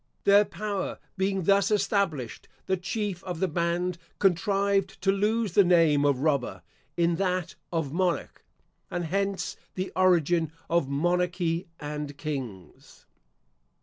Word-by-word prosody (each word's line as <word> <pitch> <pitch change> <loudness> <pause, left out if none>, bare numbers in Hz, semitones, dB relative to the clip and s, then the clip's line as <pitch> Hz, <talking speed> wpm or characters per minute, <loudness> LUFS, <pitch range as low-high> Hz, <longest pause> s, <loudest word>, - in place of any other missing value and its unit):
Their 200 +1 +6
power 200 +2 -4 0.2
being 190 -1 0
thus 200 +3 +4
established, 195 - 0 0.2
the 190 - +1
chief 190 0 -3
of 180 -3 -5
the 190 - +2
band 170 +1 -1 0.2
contrived 195 +1 +1
to 195 - +4
lose 210 +2 +1
the 200 - +6
name 165 -5 +4
of 140 -3 +2
Robber 140 -5 0 0.3
in 170 -1 +2
that 185 -2 -1 0.2
of 160 -5 -2
Monarch; 180 0 -1 0.5
and 175 -2 -3
hence 195 +3 -1 0.2
the 185 +1 -3
origin 175 -3 +3 0.2
of 170 -5 +2
Monarchy 175 +3 0
and 150 -1 -5
Kings. 130 - -7
180 Hz, 125 wpm, -27 LUFS, 160-195 Hz, 0.5 s, Their